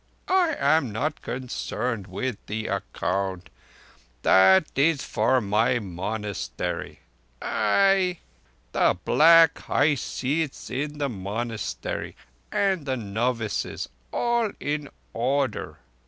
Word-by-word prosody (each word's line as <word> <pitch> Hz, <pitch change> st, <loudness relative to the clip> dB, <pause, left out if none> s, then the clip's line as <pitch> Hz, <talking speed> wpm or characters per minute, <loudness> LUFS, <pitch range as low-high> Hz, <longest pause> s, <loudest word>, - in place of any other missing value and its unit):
I 360 Hz, -4 st, +3 dB
am 150 Hz, -7 st, +3 dB
not 145 Hz, +8 st, -2 dB
concerned 125 Hz, -4 st, -3 dB
with 105 Hz, +5 st, -4 dB
the 110 Hz, +1 st, -3 dB
account. 95 Hz, -1 st, -2 dB, 0.7 s
That 95 Hz, 0 st, +6 dB
is 145 Hz, +1 st, +3 dB
for 130 Hz, -, +2 dB
my 110 Hz, +4 st, +2 dB
monastery. 100 Hz, -3 st, -4 dB, 0.4 s
Ai! 185 Hz, -, +2 dB, 0.5 s
The -, -, +3 dB
black 165 Hz, 0 st, +6 dB
high 150 Hz, -, +2 dB
seats 145 Hz, +2 st, -3 dB
in 145 Hz, +4 st, -3 dB
the 145 Hz, -1 st, 0 dB
monastery, 110 Hz, +1 st, -4 dB, 0.4 s
and 140 Hz, -, -1 dB
novices 115 Hz, -2 st, -1 dB, 0.2 s
all 235 Hz, -3 st, +1 dB
in 145 Hz, 0 st, -3 dB, 0.2 s
order!" 130 Hz, 0 st, -1 dB
125 Hz, 95 wpm, -25 LUFS, 105-150 Hz, 0.7 s, That